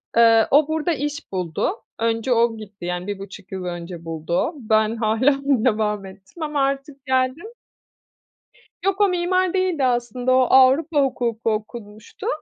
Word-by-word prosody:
Eee, 225 -1 +6
o 290 +1 +5
burada 320 +2 0
iş 290 -2 -5
buldu. 180 - -1 0.3
Önce 230 +2 0
o 230 -1 +2
gitti, 210 -4 -10
yani, 180 +2 -3
1,5 195 -1 -8
yıl 190 -1 -5
önce 175 -1 -6
buldu 160 0 -5
o. 325 - -2
Ben 220 -2 +1
hâlâ 230 +5 +2
devam 215 -6 +1
ettim 190 - -11
ama 295 -2 -1
artık 275 0 -3
geldim. 260 +6 0 1.4
Yok 390 +1 +1
o 405 - +6
mimar 365 +1 +1
değildi 370 -6 0
aslında, 245 0 0
o 260 - +5
Avrupa 280 +4 +5
hukuku 235 -4 -1
okumuştu. 215 0 -7
240 Hz, 145 wpm, -22 LUFS, 210-285 Hz, 1.4 s, Eee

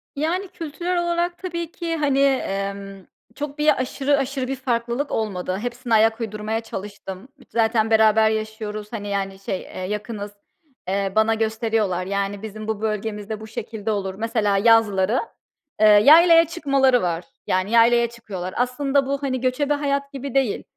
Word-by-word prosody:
Yani, 335 +7 -1
kültürel 345 +2 -3
olarak 345 0 -1
tabii 340 -3 -5
ki, 335 -1 -3
hani, 285 -3 +1
emm, 195 -7 -1 0.3
çok 290 +2 -5
bir 300 -3 +3
aşırı 275 +2 0
aşırı 270 -1 -2
bir 270 - -2
farklılık 245 +1 -2
olmadı. 185 -4 -2
Hepsine 240 +2 -4
ayak 225 +1 +4
uydurmaya 215 0 -3
çalıştım. 200 -1 -8 0.2
Zaten 225 -1 +1
beraber 220 0 +5
yaşıyoruz, 215 -1 -4
hani, 205 -3 -5
yani, 195 -1 -3
şey, 195 -1 -4
eee, - - -10
yakınız, 210 +2 -4 0.6
eee, 195 0 -1
bana 220 +1 +4
gösteriyorlar. 220 -4 0
"Yani, 200 +1 -2
bizim 215 0 -7
bu 220 -1 -3
bölgemizde 215 0 -3
bu 220 - -9
şekilde 220 0 -5
olur." 195 -2 -2
Mesela 215 -1 0
yazları, 220 0 +3 0.6
eee, 215 - +5
yaylaya 330 +11 +7
çıkmaları 275 -6 +2
var. 170 -1 -2 0.2
Yani 185 +3 0
yaylaya 235 0 +5
çıkıyorlar. 195 -6 -7
Aslında 270 +3 +1
bu, 280 +1 -3
hani, 260 -2 -1
göçebe 265 +3 +1
hayat 280 -1 -1
gibi 275 -1 -6
değil 265 -6 +1
225 Hz, 150 wpm, -22 LUFS, 205-275 Hz, 0.6 s, yaylaya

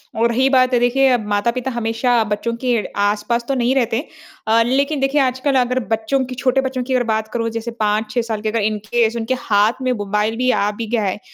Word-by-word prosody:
और 230 +1 +2
रही 260 +3 +2
बात 255 -1 +3
है, 245 - +4
देखिए 250 +1 +3
माता-पिता 235 +4 -1
हमेशा 235 0 +1
बच्चों 210 +2 -2
के 250 -1 +2 0.3
आसपास 210 +3 -1
तो 275 - 0
नहीं 250 +1 +1
रहते 245 +2 0 0.4
अ, 225 +1 +4
लेकिन 280 +4 0
देखिए 270 +2 +2
आजकल 260 +1 0
अगर 250 +1 -1 0.2
बच्चों 225 +5 -1
की 255 0 -7
छोटे 265 +1 +1
बच्चों 260 -1 -3
की 260 +1 -3
अगर 250 -1 +2
बात 220 0 -2
करूँ, 230 -1 -1
जैसे 230 +1 -5
5-6 215 +1 -1
साल 225 -2 -4
के, 215 - -1
अगर 230 - -1
इन 215 +1 0
केस 235 -1 +1
उनके 230 +2 -1
हाथ 215 +2 +1
में 255 -1 0
मोबाइल 210 0 -1
भी 255 0 +1
आ 205 - +1
भी 220 +2 -6
गया 230 -1 0
है, 195 0 -2
235 Hz, 220 wpm, -19 LUFS, 220-255 Hz, 0.4 s, है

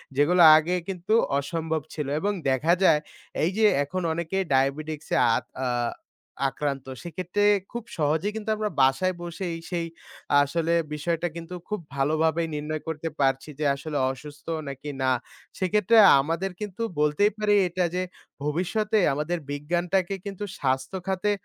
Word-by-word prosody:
যেগুলো 170 +6 +4 0.2
আগে 170 +3 +1
কিন্তু 185 +2 -2 0.3
অসম্ভব 160 +2 -2
ছিল। 150 -3 -3
এবং 205 +3 0 0.2
দেখা 150 +6 +3
যায় 150 -5 +6 0.4
এই 165 - +3
যে 220 - +4 0.2
এখন 185 +6 -4
অনেকে 170 +3 -3 0.2
ডায়াবেটিক্সে 145 +3 0 0.2
আত - - -2 0.2
আ - - +1 0.8
আক্রান্ত। 135 -1 -3 0.2
সেক্ষেত্রে 180 +4 -2 0.3
খুব 235 -1 -5
সহজেই 160 +7 +1
কিন্তু 220 0 -4
আমরা 215 0 -1
বাসায় 155 +8 +3
বসেই 175 0 -4
সেই 170 -2 -2 0.6
আসলে 165 +3 0 0.2
বিষয়টা 165 +3 -1
কিন্তু 170 +2 -7
খুব 210 -2 -2 0.2
ভালোভাবে 155 +4 +1
নির্ণয় 150 +1 -3
করতে 160 0 -3
পারছি, 135 +2 +1
যে 150 - 0
আসলে 145 +1 -4
অসুস্থ 145 +2 -11 0.2
নাকি 140 +2 -6
না। 130 - +3 0.5
সেক্ষেত্রে 210 +4 +3 0.2
আমাদের 165 +6 -2
কিন্তু 210 +2 -5 0.2
বলতেই 150 +8 +3
পারি 210 -1 +3
এটা 180 +1 0
যে 185 - 0 0.4
ভবিষ্যতে 200 +8 0 0.2
আমাদের 150 +5 -1
বিজ্ঞানটাকে 175 +6 0
কিন্তু 200 0 -5 0.2
স্বাস্থ্যখাতে 185 +9 -1
165 Hz, 135 wpm, -26 LUFS, 150-185 Hz, 0.8 s, যায়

